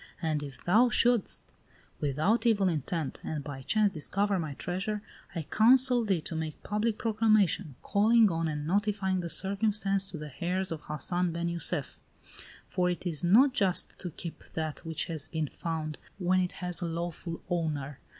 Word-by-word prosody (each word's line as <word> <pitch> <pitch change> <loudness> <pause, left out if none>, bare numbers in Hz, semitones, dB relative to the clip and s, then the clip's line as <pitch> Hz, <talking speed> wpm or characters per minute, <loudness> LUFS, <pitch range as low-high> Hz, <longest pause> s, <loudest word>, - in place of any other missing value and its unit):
And 155 -3 -1
if 140 -4 -9
thou 225 +8 +5
shouldst, 240 -3 +3 0.6
without 155 - +1
evil 205 -4 +3
intent, 160 -2 -2
and 150 -2 -4
by 140 -2 -7
chance 210 +8 +2
discover 195 +5 +1
my 155 -4 -4
treasure, 195 +7 -3 0.3
I 165 - -2
counsel 245 - +5
thee 195 -6 +1
to 165 - -5
make 160 -1 -5
public 210 +1 0
proclamation, 215 - +2
calling 215 +1 +4
on 165 0 -1
and 150 -1 -3
notifying 195 +1 0
the 170 -1 -4
circumstance 195 0 -1
to 165 - -6
the 150 -1 -7
heirs 185 +1 -1
of 160 -2 -4
Hassan 175 +4 -1
ben 170 +1 -2
Jussef; 170 -2 -1 0.7
for 180 -1 0
it 180 +1 -3
is 165 -4 +1
not 240 +10 +6
just 195 -7 +1
to 180 - -5
keep 170 +1 -8
that 155 -1 -4
which 160 -1 -2
has 155 -3 -1
been 160 -2 -2
found 155 0 -4 0.2
when 185 -1 +2
it 180 -1 -1
has 180 -1 +1
a 175 - -1
lawful 170 0 -5
owner. 150 -6 -2
180 Hz, 170 wpm, -29 LUFS, 160-205 Hz, 0.7 s, not